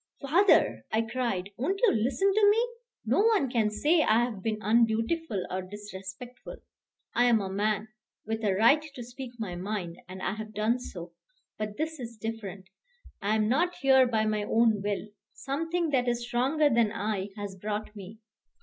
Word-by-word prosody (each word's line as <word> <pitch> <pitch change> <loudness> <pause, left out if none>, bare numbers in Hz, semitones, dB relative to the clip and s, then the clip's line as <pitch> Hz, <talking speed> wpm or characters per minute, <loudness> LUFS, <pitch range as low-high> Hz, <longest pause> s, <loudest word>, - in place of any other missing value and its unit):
"Father," 340 +8 +3
I 220 +1 +2
cried, 225 -5 -2
"won't 370 +11 -1
you 470 - +6
listen 275 - +1
to 415 0 +5
me? 455 +4 +3 0.4
No 235 +4 +2
one 410 - +3
can 225 -4 +2
say 305 +10 +2
I 230 -4 +4
have 230 -5 -4
been 220 +1 -1
undutiful 225 - +1
or 185 +1 -2
disrespectful. 205 +4 -9 0.6
I 245 - +3
am 235 -2 +4
a 195 -2 -4
man, 210 +2 -1 0.4
with 225 +1 -3
a 200 -3 +2
right 235 +9 +5
to 280 -5 -9
speak 245 +1 -9
my 210 -6 -4
mind, 180 -2 -4
and 185 +1 -8
I - - 0
have 215 0 -8
done 220 +4 +1
so; 175 -7 -8 0.5
but 210 -1 -4
this 315 0 -3
is 235 -2 -7
different. 205 -4 -6 0.5
I 210 +2 +1
am 215 -1 +2
not 340 +10 +1
here 265 -1 +5
by 220 -2 +1
my 215 -1 0
own 220 0 +2
will. 205 +1 -3 0.2
Something 325 +4 -2
that 250 -3 +1
is 240 0 0
stronger 265 +6 +2
than 230 -2 +3
I 210 -3 -2
has 205 -2 -5
brought 210 +2 -4
me. 200 +2 -10
225 Hz, 175 wpm, -28 LUFS, 205-265 Hz, 0.6 s, you